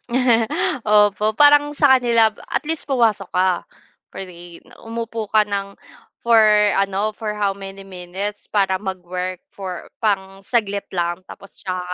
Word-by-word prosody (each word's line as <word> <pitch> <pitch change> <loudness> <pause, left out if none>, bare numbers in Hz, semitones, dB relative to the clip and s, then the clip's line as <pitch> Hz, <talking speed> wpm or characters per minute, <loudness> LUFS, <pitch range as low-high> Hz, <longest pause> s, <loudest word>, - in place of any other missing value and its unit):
Mm, 240 -2 +2 0.4
opo 210 0 +3
parang 290 +1 +5
sa 275 -3 +5
kanila 235 -3 +3 0.2
at - - 0
least 325 -1 -3
pumasok 230 -8 +1
ka 185 +1 +3 0.6
pa - - -28
rin 175 -2 -10 0.2
umupo 230 -1 -4
ka 215 -1 +5
ng, 200 0 -3 0.5
for 235 -1 +3 0.4
ano, 200 +2 0
for 215 -2 -4
how 200 -2 -1
many 195 0 -9
minutes 195 +2 -6
para 195 -2 +1
mag-work 185 -1 -5
for 185 -3 -7 0.2
pang-saglit 200 +1 -1
lang 175 -1 -1
tapos 200 - -13
saka 185 -2 -4
200 Hz, 135 wpm, -20 LUFS, 190-225 Hz, 0.6 s, parang